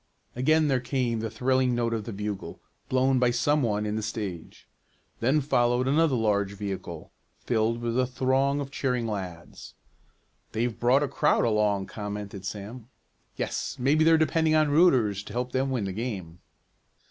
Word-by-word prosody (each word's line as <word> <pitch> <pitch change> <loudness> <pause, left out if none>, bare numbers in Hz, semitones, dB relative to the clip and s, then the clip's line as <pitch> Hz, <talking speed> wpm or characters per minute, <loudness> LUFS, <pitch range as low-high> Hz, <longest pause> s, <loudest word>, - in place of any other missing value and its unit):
Again 155 +5 +3
there 135 -3 +2
came 125 -2 -1
the 110 0 -3
thrilling 130 +1 +1
notes 115 -1 0
of 110 -2 -3
the 115 - -5
bugle, 105 -1 -5 0.3
blown 130 0 +2
by 125 -1 +3
some 135 +5 +1
one 105 -4 0
in 105 +1 -2
the - - -2
stage. 105 -6 -6 0.5
Then 135 +6 +2
followed 125 -2 +1
another 150 0 +3
large 100 -3 +1
vehicle, 95 -5 -6 0.3
filled 115 0 0
with 120 +1 0
a 130 - +2
throng 135 +2 +1
of 140 -1 -5
cheering 125 -4 -1
lads. 95 -6 -7 0.8
"They've 115 +1 -1
brought 130 +4 +4
a - - 0
crowd 150 0 +2
along," 105 -3 +1
commented 105 -1 -6
Sam. 110 +4 -7 0.5
"Yes, - - -3
maybe 140 +5 +3
they're 165 0 +6
depending 160 0 +2
on 155 -2 +3
rooters 130 - +4
to - - -10
help 125 +1 -2
them 130 +1 0
win 125 -5 -1
the 95 - -3
game." 95 -7 -5
120 Hz, 165 wpm, -27 LUFS, 105-135 Hz, 0.8 s, they're